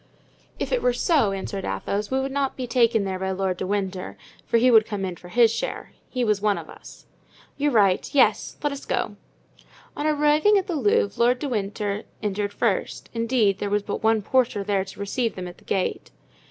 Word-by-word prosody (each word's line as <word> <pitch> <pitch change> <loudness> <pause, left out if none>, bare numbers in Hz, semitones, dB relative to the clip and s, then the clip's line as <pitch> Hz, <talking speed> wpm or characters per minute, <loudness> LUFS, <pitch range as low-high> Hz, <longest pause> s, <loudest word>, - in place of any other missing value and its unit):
"If - - -3
it - - +1
were 250 - +2
so," 245 - +2
answered 195 0 -4
Athos, 205 +1 -2
"we 265 - +1
should 270 - -3
not 275 -1 -1
be 255 - -4
taken 235 -3 +3
there 190 -1 -3
by 190 0 -2
Lord 190 -1 -1
de 185 - -3
Winter, 190 -2 -3 0.3
for 235 - +3
he 250 +2 +4
would 220 -2 +6
come 200 -3 -3
in 185 -2 -4
for 175 - -14
his 230 +2 +4
share; - - -4 0.2
he 250 -1 -1
was 210 -3 +1
one 210 -1 +2
of - - -8
us." - - -14 0.5
"You're 290 +1 +2
right; 200 -6 +3
yes, 285 - +2
let 290 - +1
us 280 - -8
go." - - -2 0.8
On 295 - -1
arriving 305 +7 +4
at 385 - 0
the 360 -5 -3
Louvre 205 -6 +1
Lord 245 +2 +4
de 285 - -4
Winter 205 -3 -2 0.2
entered 205 0 -1
first; - - -2
indeed, 230 -4 +1
there 205 - -2
was 205 0 +1
but - - -4
one 220 -1 +2
porter 240 -3 +1
there 195 -1 0
to 195 - -12
receive 220 +3 -1
them 180 -1 -5
at 175 - -11
the - - -23
gate. 190 -2 -2
215 Hz, 210 wpm, -24 LUFS, 195-255 Hz, 0.8 s, would